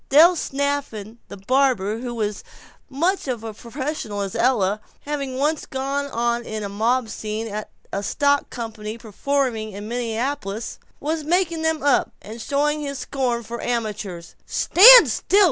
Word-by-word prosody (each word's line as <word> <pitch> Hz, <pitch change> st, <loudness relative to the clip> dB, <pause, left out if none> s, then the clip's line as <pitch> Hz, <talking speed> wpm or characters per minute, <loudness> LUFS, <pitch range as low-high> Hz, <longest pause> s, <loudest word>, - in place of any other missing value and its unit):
Del 325 Hz, +6 st, +7 dB
Snafflin 275 Hz, -8 st, -3 dB
the -, -, -9 dB
barber, 225 Hz, -1 st, +1 dB
who 240 Hz, -1 st, -5 dB
was 210 Hz, -2 st, -2 dB
as -, -, -12 dB, 0.5 s
much 335 Hz, +6 st, 0 dB
a 255 Hz, -2 st, -1 dB
professional 225 Hz, 0 st, -5 dB
as 195 Hz, -2 st, -4 dB
Ella, 215 Hz, -5 st, +1 dB, 0.2 s
having 280 Hz, -3 st, -4 dB
once 295 Hz, +3 st, 0 dB
gone 275 Hz, +2 st, -2 dB
on 235 Hz, -2 st, -1 dB
in 215 Hz, -2 st, -5 dB
a 200 Hz, -, -4 dB
mob 230 Hz, +4 st, 0 dB
scene 220 Hz, +1 st, -4 dB
at 215 Hz, 0 st, -5 dB, 0.2 s
a 200 Hz, -, -1 dB
stock 285 Hz, +6 st, +1 dB
company 225 Hz, -2 st, -6 dB
performance 230 Hz, -1 st, -2 dB
in 205 Hz, +1 st, -7 dB
Minneapolis, 235 Hz, -1 st, -3 dB, 0.2 s
was 310 Hz, +2 st, -2 dB
making 335 Hz, 0 st, 0 dB
them 320 Hz, -1 st, 0 dB
up, 285 Hz, -2 st, +2 dB
and 225 Hz, +2 st, -9 dB
showing 295 Hz, +4 st, 0 dB
his 280 Hz, -1 st, -4 dB
scorn 250 Hz, -3 st, -2 dB
for 235 Hz, +2 st, -6 dB
amateurs 210 Hz, -7 st, -4 dB
with, -, -, -32 dB
"Stand 470 Hz, -, +9 dB
still! 390 Hz, -, +2 dB
245 Hz, 155 wpm, -22 LUFS, 215-285 Hz, 0.5 s, Stand